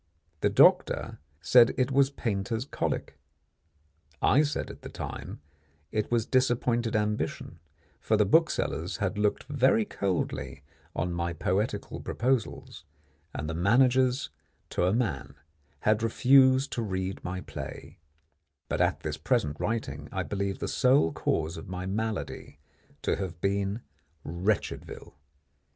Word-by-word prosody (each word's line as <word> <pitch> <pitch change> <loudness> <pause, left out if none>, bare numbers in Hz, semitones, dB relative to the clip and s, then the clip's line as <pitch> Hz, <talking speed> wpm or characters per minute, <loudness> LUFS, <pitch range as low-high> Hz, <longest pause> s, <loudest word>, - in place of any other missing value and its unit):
The - - +2
doctor - - +4 0.2
said 120 +7 +6
it 130 +1 +1
was 135 0 +4
painter's 115 -2 -2
colic; - - -3 1.0
I 140 - +4
said 150 -2 -2
at - - -13
the - - -8
time - - -7 0.5
it 105 -1 -1
was 115 -2 +1
disappointed 120 -3 +1
ambition, 105 -5 -2 0.4
for 110 - +1
the 105 - +4
booksellers 160 - +1
had - - -2
looked 105 0 +1
very 130 -6 +2
coldly 75 -9 -3 0.3
on 90 0 -1
my 85 0 -2
poetical 100 +5 -2
proposals, 125 -1 -2 0.5
and 75 - -5
the 80 - -3
managers 125 - +3 0.4
to - - +1
a 90 - +3
man 95 - -1 0.5
had 110 +1 +2
refused 130 +3 +4
to 120 - -2
read 95 -3 -3
my 90 +1 -4
play; 90 - -8 0.7
but - - 0
at - - +1
this - - -4
present 75 0 0
writing 75 -10 -3
I 95 -1 -2
believe 100 0 -2
the - - -4
sole 125 - +3
cause 80 +2 -1
of 80 - -9
my 90 0 -4
malady 105 -6 -4 0.5
to - - +1
have 90 -4 -5
been 100 +3 -1 0.4
Wretchedville. 90 +5 -3
105 Hz, 130 wpm, -28 LUFS, 90-125 Hz, 1.0 s, said